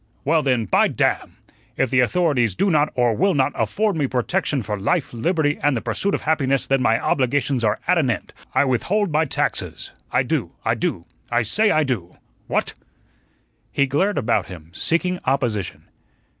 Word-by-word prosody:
Well, 160 +3 +3
then, 125 -5 +1
by - - +3
damn! - - -1 0.4
if 135 - +1
the 130 - +3
authorities 125 - +2
do 195 - +1
not 150 -1 +2
or 120 -2 +2
will 195 - +2
not 135 -2 +2
afford 195 - 0
me 145 -4 0
protection 135 +2 -1
for 105 0 -4
life, 150 - 0
liberty, 145 +4 0
and 145 -4 +2
the - - -3
pursuit 125 - -1
of - - -5
happiness, 135 -4 +1
then 135 -1 +1
my 115 -2 +3
obligations 130 -1 0
are 105 -2 +1
at 180 - +4
an 135 -5 +1
end; 120 - -3 0.2
I - - +4
withhold 180 - 0
my 155 +2 +2
taxes. 135 - -2 0.2
I - - +2
do - - -2
I - - +3
do - - -2 0.2
I 120 0 +1
say 210 - +2
I 155 -5 +3
do. 110 - -4 0.3
What?" - - -1 1.0
He 140 - +2
glared 185 +10 0
about 115 -7 +1
him, 85 -3 -11
seeking 180 - 0
opposition. 120 -8 -1
135 Hz, 180 wpm, -21 LUFS, 120-160 Hz, 1.0 s, at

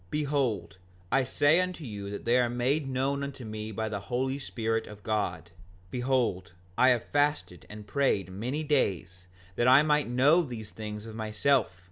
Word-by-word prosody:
5:46 - - -30
Behold, 135 - -1 0.3
I 135 +1 +3
say 145 +6 +3
unto 180 -3 -4
you 100 -4 -5
they 120 +2 +2
are 120 -1 +2
made 135 +4 0
known 135 +2 -1
unto 140 -3 -6
me 110 0 -5
by 110 +1 -3
the 105 -2 -3
Holy 130 +7 -2
Spirit 115 -4 -2
of 105 -1 -12
God. 90 -6 -2 0.4
Behold, 125 -9 0 0.2
I 130 - +5
have 120 -2 +2
fasted 145 - 0
and 105 0 -9
prayed 100 - 0
many 125 +11 -3
days 90 - -1 0.3
that 120 - +2
I 130 +3 +7
might 150 -3 +2
know 140 +8 +4
these 115 -9 -7
things 105 -1 -7
of 110 - -8
myself. 110 -2 +1
120 Hz, 170 wpm, -29 LUFS, 105-140 Hz, 0.4 s, I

